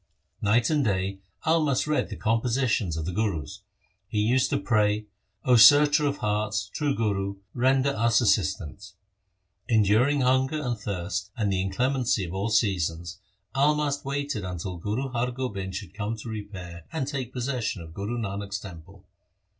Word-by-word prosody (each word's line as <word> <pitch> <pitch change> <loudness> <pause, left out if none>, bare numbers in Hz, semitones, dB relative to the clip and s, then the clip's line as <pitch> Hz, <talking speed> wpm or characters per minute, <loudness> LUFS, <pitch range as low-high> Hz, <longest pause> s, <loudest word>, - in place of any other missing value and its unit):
Night 115 +6 +3
and 150 -2 +2
day 95 -3 -1 0.3
Almast 155 -4 +2
read 150 0 0
the - - -5
compositions 115 - 0
of 80 - -3
the 90 - -2
Gurus. 95 -2 -2 0.5
He 105 - -1
used 125 +5 +2
to - - +1
pray, 105 +1 +1 0.2
' 95 +1 -37
0 125 -1 +5
searcher 145 +6 +7
of 140 0 -1
hearts, 105 -2 -1
true 145 +2 -1
Guru, 100 -3 -1 0.2
render 130 +2 +2
us 115 -2 +3
assistance.' 95 - 0 0.7
Enduring 115 +5 +3
hunger 130 +4 +2
and 125 -5 -2
thirst 100 -1 -4
and 105 -4 0
the 95 - +1
inclemency 120 +2 0
of 85 - -7
all 100 +3 -1
seasons, 90 -5 0 0.3
Almast 145 +1 +1
waited 140 -5 -3
until 90 0 -5
Guru 110 +10 -2
Har 125 0 -1
Gobind 100 -7 -4
should 95 -1 -6
come 110 +2 -3
to 110 +2 -8
repair 95 -6 -7
and 140 -5 -2
take 135 -4 -4
possession 125 -8 -2
of 80 0 -12
Guru 105 +7 -3
Nanak's 100 -2 -3
temple. 85 -6 -12
110 Hz, 155 wpm, -26 LUFS, 95-130 Hz, 0.7 s, searcher